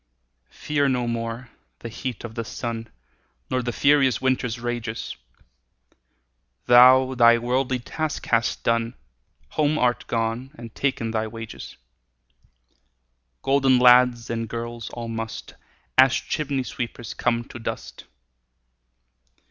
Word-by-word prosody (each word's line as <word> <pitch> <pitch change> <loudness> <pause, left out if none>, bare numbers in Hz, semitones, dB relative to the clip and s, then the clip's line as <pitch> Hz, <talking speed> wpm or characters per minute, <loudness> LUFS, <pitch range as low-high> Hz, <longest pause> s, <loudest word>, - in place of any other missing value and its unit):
Fear 145 -2 -1
no 125 -2 0
more 115 +1 -4 0.3
the 115 - -6
heat 120 +2 -6
o' - - -5
the 115 +1 -5
sun, 115 0 -5 0.6
Nor 130 - +1
the 120 0 -3
furious 135 -5 +3
winter's 125 -2 -1
rages; 120 -2 -4 1.5
Thou 130 +2 +7
thy 120 -1 +6
worldly 125 +2 0
task 155 +5 -4
hast 115 0 0
done, 115 +1 0 0.5
Home 155 0 +1
art 125 -2 0
gone, 115 +3 -2
and 115 -2 -10
ta'en 125 -5 -1
thy 110 0 -1
wages: 115 0 -9 1.7
Golden 135 -1 +3
lads 125 -1 +5
and 115 -1 -3
girls 115 0 -5
all 120 -1 -6
must, 115 0 -6 0.5
As 130 -1 +7
chimney 140 -4 -2
sweepers, 120 -2 -6
come 120 -1 0
to 120 - -9
dust. 115 - -6
120 Hz, 115 wpm, -24 LUFS, 115-130 Hz, 1.7 s, Thou